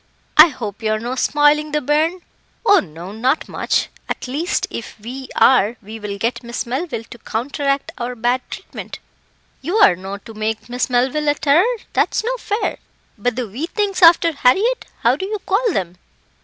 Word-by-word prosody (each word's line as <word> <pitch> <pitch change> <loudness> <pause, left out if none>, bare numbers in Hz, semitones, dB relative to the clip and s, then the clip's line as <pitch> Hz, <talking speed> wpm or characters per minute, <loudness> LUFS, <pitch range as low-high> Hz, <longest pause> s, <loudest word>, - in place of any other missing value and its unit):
"I 310 +2 +10
hope 225 - -6
you're 215 -1 +1
no 240 +3 -4
spoiling 295 +3 +2
the 300 - +2
bairn." 310 +6 +1 0.4
"Oh! 405 -3 +7
no, 170 +2 -8
not 250 +8 0
much - - 0 0.2
at - - -3
least, 315 +9 -1
if 230 - -7
we 255 +5 -8
are, 240 -3 +4
we 220 +2 -9
will 205 -1 -5
get 230 +4 -1
Miss 235 -1 -4
Melville 260 0 -3
to 240 - -10
counteract 275 +5 -2
our 245 +1 -3
bad 245 +2 +1
treatment." - - -8 0.6
"You're 355 - +4
no 190 +2 -6
to 225 +2 -13
make 220 +1 -3
Miss 250 +2 -1
Melville 260 +5 +1
a 290 - +3
terror 345 - +3 0.2
that's - - +1
no - - -1
fair. 425 -1 -2 0.4
But 240 +3 -1
the 250 -2 -3
wee 255 +11 -4
things 400 -1 -1
after 335 0 +7
Harriett, 385 - +2 0.2
how 235 +2 +4
do 380 - -4
you 425 +1 -2
call 435 +4 +2
them?" 180 - -3
260 Hz, 175 wpm, -19 LUFS, 225-325 Hz, 0.6 s, I